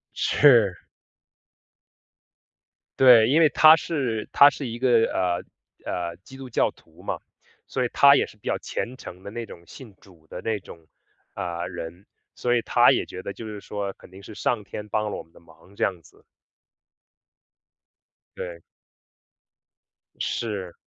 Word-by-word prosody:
是。 115 Hz, -10 st, +4 dB, 2.2 s
对， 120 Hz, -4 st, +7 dB
因 155 Hz, +5 st, +4 dB
为 155 Hz, -, +6 dB
她 155 Hz, 0 st, +7 dB
是 130 Hz, -10 st, -3 dB
她 140 Hz, +1 st, +8 dB
是 140 Hz, -, -6 dB
一 115 Hz, 0 st, -6 dB
个， 120 Hz, -3 st, +4 dB
呃， 90 Hz, -2 st, -1 dB, 0.5 s
呃， 85 Hz, -1 st, -4 dB
基 135 Hz, -, -13 dB
督 130 Hz, -2 st, -9 dB
教 -, -, +1 dB
徒 -, -, -22 dB
嘛， -, -, -3 dB, 0.5 s
所 130 Hz, -, -2 dB
以 -, -, -2 dB
她 140 Hz, 0 st, +7 dB
也 -, -, +1 dB
是 105 Hz, -, -17 dB
比 -, -, -13 dB
较 -, -, 0 dB
虔 125 Hz, +2 st, -5 dB
诚 90 Hz, -4 st, -11 dB
的 100 Hz, -, -8 dB
那 115 Hz, +1 st, -5 dB
种 85 Hz, -4 st, -13 dB
信 110 Hz, 0 st, -13 dB
主 85 Hz, -5 st, -21 dB
的 90 Hz, -, -8 dB
那 110 Hz, -2 st, -2 dB
种， 80 Hz, -3 st, -14 dB, 0.5 s
呃， 85 Hz, -2 st, -4 dB
人。 85 Hz, +1 st, -8 dB, 0.3 s
所 120 Hz, 0 st, 0 dB
以 120 Hz, -, +2 dB
她 -, -, +4 dB
也 -, -, 0 dB
觉 95 Hz, -, -9 dB
得 100 Hz, -, -5 dB
就 115 Hz, -, -9 dB
是 105 Hz, -1 st, -7 dB
说 100 Hz, -1 st, -5 dB
肯 -, -, -18 dB
定 95 Hz, +1 st, -14 dB
是 110 Hz, -, -10 dB
上 115 Hz, -4 st, -1 dB
天 105 Hz, +1 st, -8 dB
帮 105 Hz, 0 st, -1 dB
了 -, -, -4 dB
我 -, -, -6 dB
们 80 Hz, -, -29 dB
的 -, -, -17 dB
忙 85 Hz, +4 st, -21 dB
这 -, -, -2 dB
样 90 Hz, -3 st, -1 dB
子。 -, -, -22 dB, 2.1 s
对。 85 Hz, -2 st, -7 dB, 1.6 s
是。 100 Hz, -6 st, -3 dB
105 Hz, 175 characters per minute, -24 LUFS, 90-120 Hz, 2.2 s, 她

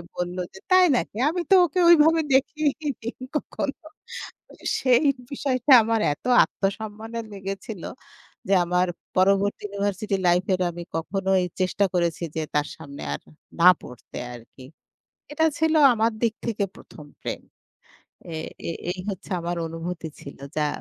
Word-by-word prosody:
বলল 180 Hz, +1 st, -3 dB, 0.2 s
যে, 190 Hz, -, -11 dB
তাই 370 Hz, 0 st, +7 dB
নাকি? 215 Hz, -, -4 dB
আমি 350 Hz, +2 st, -1 dB
তো -, -, +9 dB
ওকে 355 Hz, +3 st, -2 dB
ওইভাবে 325 Hz, 0 st, +6 dB
দেখিনি 280 Hz, -3 st, -1 dB
কখনো। 290 Hz, -1 st, -4 dB, 1.0 s
সেই 255 Hz, +2 st, +4 dB, 0.3 s
বিষয়টা 270 Hz, -1 st, 0 dB
আমার 225 Hz, 0 st, +1 dB
এত -, -, -18 dB, 0.2 s
আত্মসম্মানে 220 Hz, +3 st, -4 dB
লেগেছিল। 195 Hz, 0 st, -6 dB, 0.7 s
যে -, -, +4 dB
আমার 180 Hz, +1 st, +2 dB, 0.3 s
পরবর্তী 195 Hz, +2 st, +3 dB
ইউনিভার্সিটি 200 Hz, 0 st, -2 dB
লাইফ 180 Hz, +2 st, +3 dB
এর 185 Hz, -, 0 dB
আমি 175 Hz, +1 st, -7 dB
কখনোই 190 Hz, +2 st, 0 dB, 0.2 s
চেষ্টা 185 Hz, +2 st, +2 dB
করেছি 170 Hz, -1 st, 0 dB
যে 160 Hz, -, -1 dB
তার 150 Hz, 0 st, +2 dB
সামনে 140 Hz, -3 st, -9 dB
আর -, -, -5 dB, 0.4 s
না 180 Hz, -, +10 dB
পড়তে 125 Hz, -, -11 dB, 0.2 s
আরকি। 120 Hz, +2 st, -14 dB, 0.7 s
এটা 320 Hz, +2 st, +2 dB
ছিল 320 Hz, 0 st, +2 dB, 0.2 s
আমার 225 Hz, +1 st, +2 dB
দিক 230 Hz, -2 st, +2 dB
থেকে 220 Hz, -3 st, -1 dB
প্রথম 150 Hz, -, -13 dB, 0.2 s
প্রেম। -, -, -4 dB, 0.9 s
এ -, -, -5 dB, 0.3 s
এই, 165 Hz, -, -3 dB, 0.2 s
এই 185 Hz, -, -11 dB
হচ্ছে 190 Hz, 0 st, -8 dB
আমার 175 Hz, +1 st, -3 dB
অনুভূতি 165 Hz, 0 st, -5 dB
ছিল 140 Hz, -, -10 dB, 0.2 s
যা 150 Hz, -1 st, +2 dB
200 Hz, 140 wpm, -24 LUFS, 175-255 Hz, 1.0 s, না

